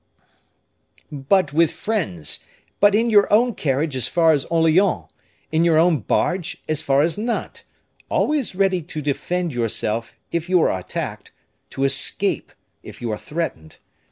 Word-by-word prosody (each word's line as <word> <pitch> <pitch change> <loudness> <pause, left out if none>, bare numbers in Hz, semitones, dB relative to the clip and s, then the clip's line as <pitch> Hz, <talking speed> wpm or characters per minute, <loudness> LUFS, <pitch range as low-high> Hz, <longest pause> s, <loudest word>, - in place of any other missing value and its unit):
"But 145 +3 +1
with 165 +1 +4
friends; 125 - -3 0.4
but 205 0 +5
in 230 +2 +2
your 205 -2 +5
own 235 +3 +4
carriage 145 -2 -1
as 130 - 0
far 165 -2 +4
as 140 -3 0
Orleans; 165 - +2 0.5
in 160 +1 +2
your 165 -2 +4
own 165 -2 +4
barge 175 - -1
as 155 -1 -1
far 140 0 +2
as 170 +5 0
Nantes; 230 +2 -3 0.4
always 295 -10 0
ready 190 -2 +2
to 155 -1 -7
defend 170 +4 -2
yourself, 115 -1 -2 0.2
if 170 +1 -2
you 185 -1 +4
are - - +2
attacked; 95 - -5 0.4
to 135 - -3
escape, 135 0 0 0.3
if - - -11
you 120 -2 -3
are 105 - -2
threatened. 150 - -5
165 Hz, 150 wpm, -21 LUFS, 135-185 Hz, 0.5 s, but